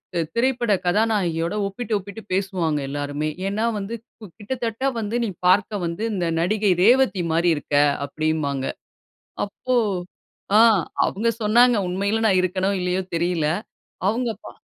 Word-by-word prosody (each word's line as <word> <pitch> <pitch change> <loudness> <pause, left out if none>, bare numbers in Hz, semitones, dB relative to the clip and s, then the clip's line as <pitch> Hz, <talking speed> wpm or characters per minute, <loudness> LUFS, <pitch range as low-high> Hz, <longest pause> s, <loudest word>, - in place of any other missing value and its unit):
து - - +1 0.2
திரைப்பட 240 -2 +1
கதாநாயகியோட 180 -4 +1
ஒப்பிட்டு 220 +3 -5
ஒப்பிட்டு 200 +3 -9
பேசுவாங்க 185 -6 0
எல்லாருமே. 145 +1 -3 0.2
ஏன்னா 215 +3 -1
வந்து 205 +4 -4 0.2
கு 215 - -10
"கிட்டத்தட்ட 230 +2 -4 0.2
வந்து, 220 +2 -3
நீ - - -2 0.2
பார்க்க 200 +1 +2
வந்து, 170 +6 -3
இந்த 175 -3 -1
நடிகை 205 +3 +2
ரேவதி 240 -5 +4
மாரி 170 +2 +2
இருக்க" 145 0 -4 0.3
அப்படின்பாங்க. 150 -3 -1 0.8
அப்போ, 255 +5 -3 0.8
ஆ - - +7 0.5
அவுங்க 230 +4 0
சொன்னாங்க, 240 +3 +5
உண்மையிலே 200 +5 0
நான் 190 -2 +3
இருக்கேனோ, 190 +2 0
இல்லையோ 180 +1 0
தெரியலை. 165 -2 0 0.5
அவுங்க 235 +2 0
பா - - -8
195 Hz, 130 wpm, -23 LUFS, 170-225 Hz, 0.8 s, ஆ